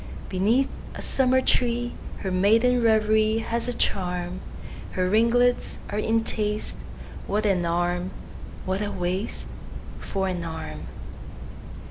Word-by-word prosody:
Beneath 220 +8 +2 0.3
a - - -5
summer 260 -1 +3
tree, 240 -1 +2 0.3
Her 190 - -2
maiden 225 +7 +4
reverieHas 220 +1 +2
a 245 - -1
charm; 180 -3 -1 0.5
Her 185 -1 +1
ringlets 235 +4 +3
are 205 - -1
in 225 +1 +2
taste; 210 -1 -1 0.5
What 210 +2 0
an 180 -4 +2
arm!… 175 +1 0 0.6
what 190 +2 -1
a 205 - -1
waistFor 190 +1 -4
an 175 -2 -3
arm! 160 -1 -6
210 Hz, 110 wpm, -25 LUFS, 185-230 Hz, 0.6 s, maiden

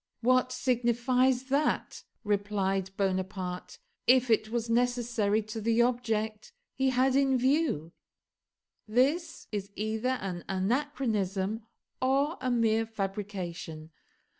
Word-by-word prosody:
"What 255 +1 +3
signifies 250 +1 +2
that," 285 +3 0 0.2
replied 200 -2 0
Bonaparte, 185 -2 -2 0.3
"if 255 -1 +5
it 220 -1 +3
was 235 0 -2
necessary 230 -3 +1
to 215 +1 -6
the 230 +2 +3
object 225 - -1 0.2
he 265 0 +1
had 260 +1 +2
in 270 -1 +3
view?" 260 - +1 1.0
This 270 +10 +1
is 200 -2 -3
either 220 +5 -1
an 180 -3 -4
anachronism 210 -2 -1 0.4
or 275 +5 +1
a 255 - 0
mere 225 -2 +2
fabrication. 190 -6 -5
225 Hz, 105 wpm, -29 LUFS, 200-255 Hz, 1.0 s, if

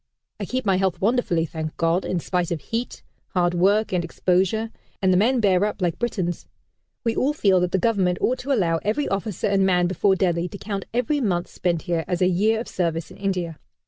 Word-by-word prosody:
I - - -3
keep 255 -1 -3
my 195 -2 +3
health 185 -2 0
wonderfully, 200 -6 +1
thank 155 -1 -6
God! 165 +2 +1
in 180 - -1
spite 180 0 -1
of 170 - -2
heat, 230 - -4 0.3
hard 175 -1 +2
work 200 +4 +2
and 180 -1 +1
exposure; 190 +6 0 0.3
and 190 -2 +3
the - - +4
men 240 +6 +3
bear 195 -3 +3
up 210 0 -1
like 175 -3 -1
Britons. 185 -8 -2 0.6
We 230 -1 0
all 280 +3 +1
feel 195 -10 +3
that 180 0 0
the - - +2
Government 190 -3 +1
ought 255 +1 0
to 280 - -4
allow 175 -10 +2
every 225 +8 0
officer 195 -1 -2
and 195 -1 +2
man 180 -2 +3
before 190 +2 +2
Delhi 175 -2 0
to 200 - -8
count 200 -1 -4
every 250 +5 0
month 180 -7 0
spent 170 -2 -1
here 170 -3 -1
as 180 -2 -1
a 180 - +4
year 210 +5 +2
of 235 - -5
service 165 -2 -2
in - - -12
India. 180 -5 -2
190 Hz, 215 wpm, -23 LUFS, 175-215 Hz, 0.6 s, the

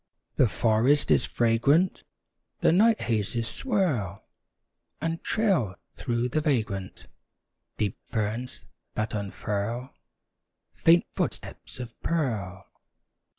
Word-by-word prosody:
The 130 - +4
forest 115 +7 +3
is - - +4
fragrant; 135 +10 +2 0.6
The - - +5
night 220 +6 +4
hazes 115 +1 0
swirl 150 - -1 0.8
And 165 +2 -2
trail, 180 - +1 0.2
through 120 +1 -1
the 155 +5 0
vagrant 100 - -1 0.7
Deep 105 -3 -1
ferns 110 +3 -3 0.3
that 110 0 -2
unfurl, 105 +4 -3 0.8
Faint 170 +1 +5
footsteps - - -4
of 120 -2 -6
pearl. 105 - -2
120 Hz, 95 wpm, -27 LUFS, 105-155 Hz, 0.8 s, The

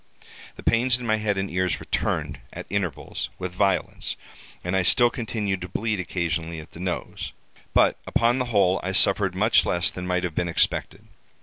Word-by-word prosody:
The - - -11
pains 120 +2 +3
in 125 - -6
my 110 -1 +2
head 105 -2 0
and 95 0 -1
ears 90 0 0
returned, - - -2
at - - -7
intervals, 90 -8 -2
with 90 -1 -4
violence, 95 0 0 0.5
and 90 +1 -1
I 95 - +3
still 120 +6 +5
continued 105 -5 -2
to 90 - -4
bleed 105 +3 -1
occasionally 85 -2 -2
at 80 - -12
the - - -12
nose; 90 -1 -4 0.4
but, - - +4
upon 120 +2 +2
the 125 - 0
whole, 100 -5 +3
I 95 +1 -3
suffered 95 -1 +4
much 110 +4 +4
less 85 -3 +1
than 90 0 -6
might 90 0 0
have 90 -3 -2
been 85 +2 -1
expected. 85 - 0
95 Hz, 185 wpm, -25 LUFS, 90-110 Hz, 0.5 s, still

